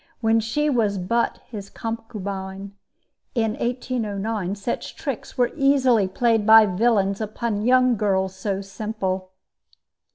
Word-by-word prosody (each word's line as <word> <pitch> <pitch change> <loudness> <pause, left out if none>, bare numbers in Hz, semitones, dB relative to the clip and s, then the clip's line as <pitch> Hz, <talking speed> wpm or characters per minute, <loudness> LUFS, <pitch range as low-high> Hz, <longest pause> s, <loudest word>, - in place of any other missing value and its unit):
when 225 -1 +3
she 230 +7 0
was 225 -8 +1
but 230 +6 0
his 200 -3 -7
concubine. 200 -3 -6 0.6
In 225 -2 +1
1809 220 -5 -2
such 205 +4 -4
tricks - - -5
were 245 -1 +2
easily 265 -7 +3
played 225 +3 +1
by 220 +1 +8
villains 200 0 +1
upon 215 0 -2
young 255 +1 +4
girls 190 -2 0
so 195 0 -2
simple. 195 -2 -4
215 Hz, 120 wpm, -23 LUFS, 195-235 Hz, 0.6 s, by